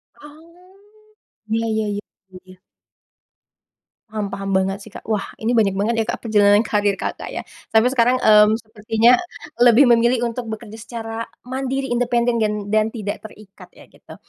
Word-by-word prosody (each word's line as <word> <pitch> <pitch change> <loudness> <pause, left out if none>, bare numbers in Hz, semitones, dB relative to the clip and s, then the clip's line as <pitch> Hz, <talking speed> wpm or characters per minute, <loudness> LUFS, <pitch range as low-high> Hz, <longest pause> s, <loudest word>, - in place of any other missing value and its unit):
Oh. 335 +6 -17 0.7
Iya 225 +1 -1
iya-iya, 210 -2 -2 0.4
iya. 185 0 -16 1.5
Paham 210 -2 -4
paham 195 0 -5
banget 195 +1 0
sih, 205 - -13
Kak. 210 - -11
Wah 210 -2 -3
ini 225 +2 -2
banyak 215 -5 +2
banget 210 +4 0
ya, 220 - +1
Kak, - - -4
perjalanan 205 -1 +4
karier 205 -3 0
Kakak - - -5
ya. - - -6 0.3
Sampai 235 +3 +5
sekarang, 245 -1 +3
eee, 210 -1 +7
sepertinya 225 +2 +2 0.4
lebih 245 +2 +6
memilih 240 -1 +3
untuk 240 0 -6
bekerja 220 0 -8
secara 225 -1 -7 0.3
mandiri, 265 +1 -3
independen 240 -1 +1
dan 215 -1 +1 0.2
dan 215 0 +3
tidak 215 -3 -5
terikat 210 -2 -14
ya - - -15
gitu. - - -15
225 Hz, 150 wpm, -20 LUFS, 210-240 Hz, 1.5 s, eee